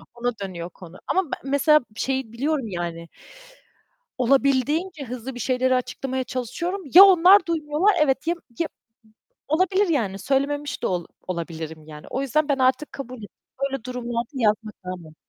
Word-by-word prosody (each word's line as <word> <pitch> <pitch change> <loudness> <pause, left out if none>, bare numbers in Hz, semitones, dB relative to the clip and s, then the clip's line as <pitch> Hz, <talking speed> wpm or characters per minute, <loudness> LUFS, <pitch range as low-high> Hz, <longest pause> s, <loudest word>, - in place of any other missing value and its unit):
Ona 245 +1 -1
dönüyor 175 -3 -6
konu 180 0 -13
ama 380 0 +1
be - - 0
mesela 285 +3 +4
şeyi 265 -2 -2
biliyorum 275 +1 -1
yani 170 -3 -5 1.1
olabildiğince 275 +6 +1
hızlı 250 +1 -6
bir 245 - -7
şeyleri 255 +1 +1
açıklamaya 260 +1 -2
çalışıyorum. 340 - -4
Ya 380 +3 +12
onlar 370 -1 +7
duymuyorlar, 325 +4 +1
evet 270 0 +1
ya 340 - +2 0.2
ya 335 - 0 0.8
olabilir 375 +6 +2
yani 215 - 0
söylememiş 285 +5 -1
de - - +2
ol 175 -2 -2 0.2
olabilirim 160 -3 -5
yani. 150 -1 -11
O 265 - -2
yüzden 290 +3 0
ben 280 - +2
artık 260 +3 +1
kabul 255 -4 -8
et 205 - -9 0.4
Böyle 270 -4 -5
durumlarda 240 -2 -4
yazmak. 215 -4 0
Aynen. 175 -4 -8
260 Hz, 150 wpm, -24 LUFS, 215-300 Hz, 1.1 s, Ya